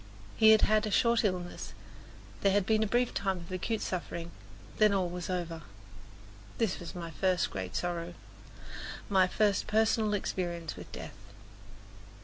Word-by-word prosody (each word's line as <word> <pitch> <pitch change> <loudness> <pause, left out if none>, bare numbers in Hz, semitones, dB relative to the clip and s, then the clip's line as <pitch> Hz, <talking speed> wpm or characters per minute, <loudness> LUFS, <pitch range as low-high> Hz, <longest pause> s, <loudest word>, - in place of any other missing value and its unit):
He 220 - +6
had 220 -1 +7
had 215 0 +3
a - - -1
short 235 +3 +3
illness, 180 -3 -2 0.7
there 200 - +4
had 200 -2 +3
been 220 +1 +2
a 220 - +2
brief 240 +3 +1
time 195 -1 0
of 170 0 -10
acute 210 +4 -2
suffering, 170 -2 -4 0.5
then 215 -1 +6
all 185 -2 +1
was 175 0 -5
over. 170 -3 -3 1.0
This 225 -5 0
was 175 +2 -8
my 170 -2 -5
first 185 +2 +1
great 95 0 -5
sorrow 175 0 -2 0.9
my 190 -3 +5
first 205 +2 +1
personal 220 -1 +2
experience 175 -4 -3
with - - -10
death. - - -8
185 Hz, 150 wpm, -31 LUFS, 175-215 Hz, 1.0 s, had